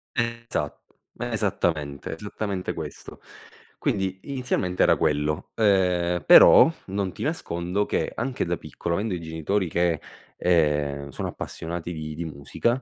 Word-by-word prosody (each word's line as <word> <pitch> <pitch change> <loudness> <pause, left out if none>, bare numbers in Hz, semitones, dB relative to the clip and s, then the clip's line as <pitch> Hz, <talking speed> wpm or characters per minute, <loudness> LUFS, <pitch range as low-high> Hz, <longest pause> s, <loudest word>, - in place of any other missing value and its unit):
Esatto, 120 -1 -3 0.2
esattamente, 90 -12 -1
esattamente 100 0 -4
questo. 75 -3 -8 0.6
Quindi 95 -1 -1
inizialmente 125 -9 -1
era - - +5
quello, 75 +1 0
uhm, 90 -5 +2
però - - +9 0.2
non 95 -1 -2
ti - - -10
nascondo 95 - -1
che - - -1
anche 130 +2 -2
da 85 0 -1
piccolo, 85 0 -4
avendo 105 +1 -1
i 90 - -3
genitori 80 +4 -1
che, 85 -1 +1 0.4
ehm, 75 -5 +1
sono - - -4
appassionati 85 +1 -5
di 75 -1 -5
di 85 - -4
musica, 80 - -1
90 Hz, 125 wpm, -25 LUFS, 80-105 Hz, 0.6 s, però